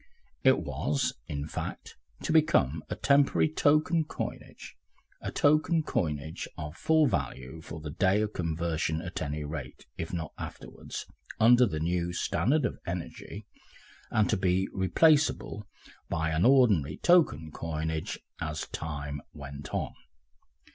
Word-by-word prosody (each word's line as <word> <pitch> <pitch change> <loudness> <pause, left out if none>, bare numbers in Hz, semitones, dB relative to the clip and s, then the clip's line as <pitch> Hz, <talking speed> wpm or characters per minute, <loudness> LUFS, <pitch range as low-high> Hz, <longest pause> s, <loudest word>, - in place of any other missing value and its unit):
It - - +6
was, 130 -3 -1
in 75 -3 -4
fact, - - -6 0.3
to - - 0
become 80 - +3
a - - -2
temporary 140 +2 +4
token 155 +2 +3
coinage, - - -7 0.5
a - - -4
token 155 +2 +3
coinage 75 - -2
of 75 +1 -6
full 160 - +3
value 65 - -3
for 80 0 -8
the 75 -1 -6
day 95 +5 +2
of 105 0 -3
conversion 80 -2 -1
at 90 - -5
any 75 0 -3
rate, 75 -4 -7
if 80 - -4
not 80 -3 -4
afterwards, - - -7 0.3
under 120 +2 +7
the 80 -6 -3
new 85 +2 -1
standard 140 - +1
of - - -3
energy, 90 +4 -6 0.6
and 110 -2 +2
to 110 - +2
be 95 0 +1
replaceable 140 - +2 0.4
by 80 0 0
an 80 +3 +2
ordinary 105 - +4
token 115 - +3
coinage 80 0 -3 0.2
as 75 0 -3
time 75 -2 -5
went 70 +1 -8
on. - - -2
85 Hz, 135 wpm, -29 LUFS, 75-125 Hz, 0.6 s, under